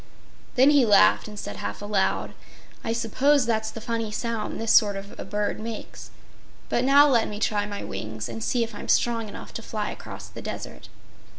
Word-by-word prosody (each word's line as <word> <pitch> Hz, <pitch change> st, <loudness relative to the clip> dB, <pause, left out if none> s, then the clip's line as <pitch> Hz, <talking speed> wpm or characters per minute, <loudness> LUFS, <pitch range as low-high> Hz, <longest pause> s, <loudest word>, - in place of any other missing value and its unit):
Then 265 Hz, +3 st, +6 dB
he 285 Hz, -3 st, +5 dB
laughed 210 Hz, -2 st, +5 dB
and 210 Hz, -1 st, -9 dB
said 105 Hz, -, -6 dB
half 100 Hz, +1 st, -5 dB
aloud: 205 Hz, -2 st, 0 dB, 0.5 s
"I -, -, -2 dB
suppose 250 Hz, +5 st, +2 dB
that's 220 Hz, -1 st, 0 dB
the 225 Hz, -, -8 dB
funny 230 Hz, -1 st, -2 dB
sound 225 Hz, 0 st, -3 dB
this 225 Hz, 0 st, +1 dB
sort 205 Hz, -2 st, +5 dB
of 195 Hz, +1 st, -8 dB
a -, -, -4 dB
bird 205 Hz, +2 st, -2 dB
makes. 220 Hz, 0 st, -7 dB, 0.6 s
But 240 Hz, -, +1 dB
now 280 Hz, +2 st, +7 dB
let 240 Hz, -5 st, +3 dB
me 210 Hz, 0 st, -6 dB
try 210 Hz, -1 st, 0 dB
my 205 Hz, -1 st, -5 dB
wings 110 Hz, 0 st, -5 dB
and 115 Hz, -2 st, -6 dB
see 245 Hz, -2 st, +1 dB
if 230 Hz, 0 st, -6 dB
I'm 205 Hz, -, -8 dB
strong 230 Hz, -2 st, +2 dB
enough -, -, -10 dB
to -, -, -5 dB
fly -, -, -3 dB
across -, -, -9 dB
the -, -, -10 dB
desert." -, -, -7 dB
220 Hz, 195 wpm, -25 LUFS, 205-235 Hz, 0.6 s, now